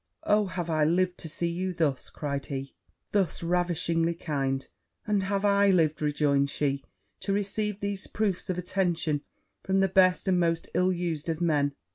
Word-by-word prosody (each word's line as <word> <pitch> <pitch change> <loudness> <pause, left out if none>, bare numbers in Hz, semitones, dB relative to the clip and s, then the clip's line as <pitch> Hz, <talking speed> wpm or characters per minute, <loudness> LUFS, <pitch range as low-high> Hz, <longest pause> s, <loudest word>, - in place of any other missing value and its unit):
'Oh, 210 -1 +3
have 180 -2 -4
I 155 -2 +2
lived 180 +3 +1
to 160 - -4
see 170 +2 0
you 180 +2 -2
thus!' 145 -6 0
cried 140 -2 -4
he, 135 0 -5 0.4
'thus 190 -5 0
ravishingly 170 -1 +1
kind!' 135 -5 -2 0.4
'And 210 -2 +1
have 195 +1 -1
I 200 0 +4
lived,' 160 -5 +2
rejoined 145 -2 +2
she, 140 -1 -1 0.4
'to 200 - -3
receive 205 +1 -1
these 200 -1 -2
proofs 200 -3 -1
of 180 - -1
affection 175 -5 0 0.4
from 190 0 +1
the 195 - +4
best 185 0 +3
and 185 -1 +3
most 165 -1 0
ill 180 +2 +3
used 170 -3 -2
of 160 -1 -1
men! 145 -4 +1
175 Hz, 170 wpm, -28 LUFS, 155-190 Hz, 0.4 s, I